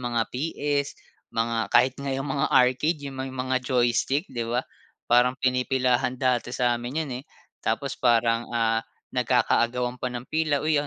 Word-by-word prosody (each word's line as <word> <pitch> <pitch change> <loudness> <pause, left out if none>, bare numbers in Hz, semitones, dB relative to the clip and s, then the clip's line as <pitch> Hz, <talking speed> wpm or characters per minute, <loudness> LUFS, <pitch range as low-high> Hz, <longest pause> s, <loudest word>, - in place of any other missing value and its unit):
mga 120 -2 0
PS, 145 0 -2 0.4
mga 115 0 0
kahit 125 +2 +4
nga 140 - -4
'yong 135 - -3
mga 140 - +1
arcade, 130 +6 +3
'yong 140 -2 -8
may 135 - -3
mga 130 0 -1
joystick, 125 +4 +1
'di 115 -1 -3
ba? 120 +2 0 0.4
Parang 125 +2 +4
pinipilahan 125 -1 +1
dati 125 -2 +1
sa 120 -1 0
'min 125 +5 -5
'yon, 140 - -8
eh. - - -20 0.4
Tapos 135 +5 -1
parang, 115 -1 +2
ah, 115 -1 +1 0.3
nagkaka-agawan 125 +1 +1
pa 125 - -3
ng 120 -1 -4
pila, 155 -3 +1
"Uy, 155 -1 +2
oh, 145 - -1
125 Hz, 165 wpm, -25 LUFS, 120-135 Hz, 0.4 s, kahit